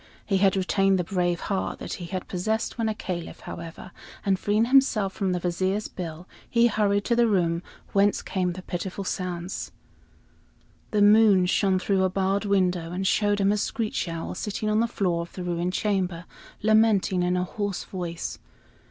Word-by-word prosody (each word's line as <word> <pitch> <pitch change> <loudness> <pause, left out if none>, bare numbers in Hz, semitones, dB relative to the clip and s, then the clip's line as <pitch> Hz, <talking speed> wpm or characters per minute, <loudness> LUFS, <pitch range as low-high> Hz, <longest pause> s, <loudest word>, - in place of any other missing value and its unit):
He 195 - +1
had 195 0 +4
retained 195 +1 +2
the 180 - 0
brave 175 -1 -1
heart 195 -3 -2
that - - -6
he - - -4
had 185 +1 -5
possessed 220 +5 -1
when 225 -2 0
a 215 - -2
Caliph, 175 -5 -5
however, 170 +2 -8 0.3
and 195 -2 +2
freeing 210 +3 +2
himself 235 -7 +3
from 195 -2 -1
the 180 - 0
Vizier's 185 +4 -1
bill, 175 0 -7 0.2
he 235 0 +4
hurried 205 -3 +2
to 235 - +2
the 235 0 +4
room 170 -5 +1 0.3
whence 200 +1 +3
came 180 -2 -1
the 185 +1 -9
pitiful 185 +3 -4
sounds. 180 -1 -4 1.2
The 210 -1 +3
moon 205 -3 +6
shone 190 +1 +2
through 190 0 +1
a 185 - +3
barred 195 +2 0
window 180 -4 +1
and 185 +2 -3
showed 205 +1 +2
him 195 0 +3
a 210 - +1
screech 215 -4 -2
owl 165 -1 -4
sitting 215 0 -2
on 215 - +3
the 230 - +2
floor 180 -7 0
of 170 - -9
the 185 - -6
ruined 175 +1 -1
chamber, 185 -5 -1 0.4
lamenting 215 -4 +3
in 180 +1 +1
a 180 - +1
hoarse 200 0 -3
voice. 175 -3 -5
190 Hz, 180 wpm, -26 LUFS, 180-205 Hz, 1.2 s, moon